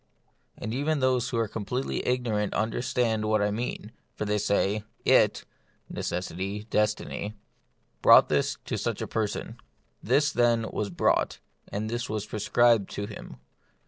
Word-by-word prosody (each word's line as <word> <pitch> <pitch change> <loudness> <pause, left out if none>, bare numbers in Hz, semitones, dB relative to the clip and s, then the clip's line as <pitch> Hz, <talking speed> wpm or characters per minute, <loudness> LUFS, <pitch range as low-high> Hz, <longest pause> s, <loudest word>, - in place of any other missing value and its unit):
And 110 +2 -4
even 145 +4 0
those 130 -2 +2
who 120 - -2
are 115 -1 +1
completely 115 +5 -3
igno 125 -4 0
rant 105 -1 -1
understand 115 0 0
what 110 0 +2
I 105 0 +1
mean, 115 +4 -4 0.2
for - - -3
they 105 0 0
say, 100 +1 +1 0.2
It - - +4 0.5
(necessity, 95 +3 -3
destiny) 105 0 -1 0.7
brought - - +8
this - - 0
to - - -2
such - - -2
a - - -4
per 110 -1 0
son. - - -6 0.4
This, 140 +6 +2
then, 120 -2 +2
was 105 - -2
brought, 85 - +1 0.3
and 105 +2 -2
this 120 +2 -3
was 105 -1 -2
prescribed 110 0 +2
to 100 - -3
him. 105 -10 -9
110 Hz, 150 wpm, -27 LUFS, 105-120 Hz, 0.7 s, brought